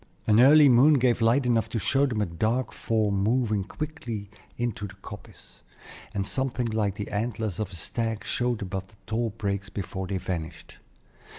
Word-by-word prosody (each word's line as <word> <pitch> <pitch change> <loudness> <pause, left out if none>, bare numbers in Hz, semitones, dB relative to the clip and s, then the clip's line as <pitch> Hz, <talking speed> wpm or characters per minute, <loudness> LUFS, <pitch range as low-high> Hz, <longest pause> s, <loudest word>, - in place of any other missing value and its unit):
An 110 +1 +4
early 145 +4 +8
moon 135 +4 +6
gave 125 -3 +2
light 120 +4 +3
enough 115 -4 +1
to - - -3
show 135 +7 +2
them 115 -5 -1
a - - +2
dark 110 +8 -1
form 105 -3 0
moving 110 -2 +1
quickly 115 -6 -6 0.3
into 120 -3 -2
the - - -13
coppice, - - -13 0.5
and 100 -2 -2
something 130 +2 -1
like 110 -3 0
the 105 - -6
antlers 110 -2 -2
of 105 -3 -2
a - - -9
stag 115 +5 -3
showed 120 -3 -1
above 95 0 -5
the 105 - -21
tall 115 +1 -1
brakes 100 -2 -3
before 95 -2 -5
they 95 - -2
vanished. 85 -3 -6
110 Hz, 175 wpm, -26 LUFS, 100-120 Hz, 0.5 s, early